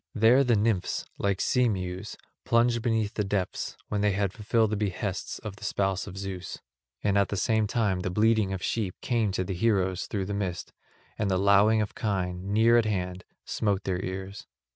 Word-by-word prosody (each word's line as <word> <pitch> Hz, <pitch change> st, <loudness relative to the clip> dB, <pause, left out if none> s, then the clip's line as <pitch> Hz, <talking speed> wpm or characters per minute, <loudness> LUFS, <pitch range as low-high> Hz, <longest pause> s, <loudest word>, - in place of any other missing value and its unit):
There 115 Hz, +5 st, +5 dB
the 120 Hz, -3 st, +3 dB
nymphs, 105 Hz, -3 st, 0 dB
like 100 Hz, -1 st, 0 dB
sea 125 Hz, -3 st, +2 dB
mews, 95 Hz, 0 st, -4 dB, 0.3 s
plunged 120 Hz, 0 st, +2 dB
beneath 110 Hz, -2 st, 0 dB
the 105 Hz, -, -1 dB
depths, 95 Hz, -2 st, -2 dB
when 105 Hz, -1 st, -1 dB
they 105 Hz, -1 st, +2 dB
had 100 Hz, -1 st, 0 dB
fulfilled 110 Hz, 0 st, +1 dB
the -, -, +1 dB
behests 100 Hz, -1 st, -3 dB
of 105 Hz, -2 st, -8 dB
the -, -, -13 dB
spouse 95 Hz, -1 st, -1 dB
of 95 Hz, -1 st, -8 dB
Zeus. 95 Hz, -2 st, -5 dB, 0.4 s
And 100 Hz, -1 st, +3 dB
at 100 Hz, -, +2 dB
the 100 Hz, -, -2 dB
same 110 Hz, +1 st, +2 dB
time 105 Hz, -4 st, 0 dB
the 90 Hz, -, -2 dB
bleating 110 Hz, +1 st, +2 dB
of 95 Hz, -2 st, -4 dB
sheep 105 Hz, -6 st, -1 dB
came 115 Hz, -5 st, +1 dB
to 95 Hz, -, 0 dB
the 95 Hz, +1 st, -4 dB
heroes 95 Hz, -2 st, +1 dB
through 100 Hz, -3 st, -2 dB
the 100 Hz, -, -4 dB
mist 95 Hz, -4 st, -3 dB, 0.5 s
and 105 Hz, -2 st, +1 dB
the 95 Hz, -, +2 dB
lowing 100 Hz, +3 st, +4 dB
of 105 Hz, -, -6 dB
kine, 95 Hz, -2 st, -2 dB
near 115 Hz, +3 st, +5 dB
at 115 Hz, -, +1 dB
hand, 90 Hz, -3 st, -2 dB, 0.2 s
smote 100 Hz, -2 st, -1 dB
their 90 Hz, -1 st, -2 dB
ears. 95 Hz, +2 st, -6 dB
100 Hz, 195 wpm, -27 LUFS, 95-110 Hz, 0.5 s, There